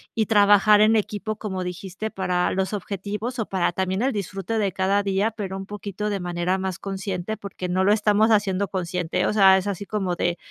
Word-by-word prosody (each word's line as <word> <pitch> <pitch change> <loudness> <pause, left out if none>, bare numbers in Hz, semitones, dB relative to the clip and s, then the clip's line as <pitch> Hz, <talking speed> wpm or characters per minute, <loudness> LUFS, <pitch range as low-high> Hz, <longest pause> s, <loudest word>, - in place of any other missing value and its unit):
y 220 -2 +1
trabajar 205 0 +5
en 215 +1 +5
equipo, 215 0 -2
como 190 -4 -4
dijiste, 190 +4 -5
para 180 -2 0
los 190 0 -1
objetivos 205 +4 -4
o 220 - -1
para 185 -2 0
también 190 +2 -1
el 265 +2 +1
disfrute 195 +2 -3
de 200 -2 +1
cada 195 +2 +1
día, 200 +3 +1
pero 200 -4 -5
un 195 - -6
poquito 205 0 -5
de 200 -2 -2
manera 175 +1 -1
más 190 -2 -4
consciente, 195 0 -4
porque 190 -2 -6
no 185 +1 +1
lo 205 - +4
estamos 215 +1 +3
haciendo 200 -2 +1
consciente. 180 -1 -2
O - - 0
sea, 195 -2 +6
es 190 +1 -3
así 200 0 -3
como 195 -4 -2
de 175 -1 0
195 Hz, 205 wpm, -24 LUFS, 185-210 Hz, -, sea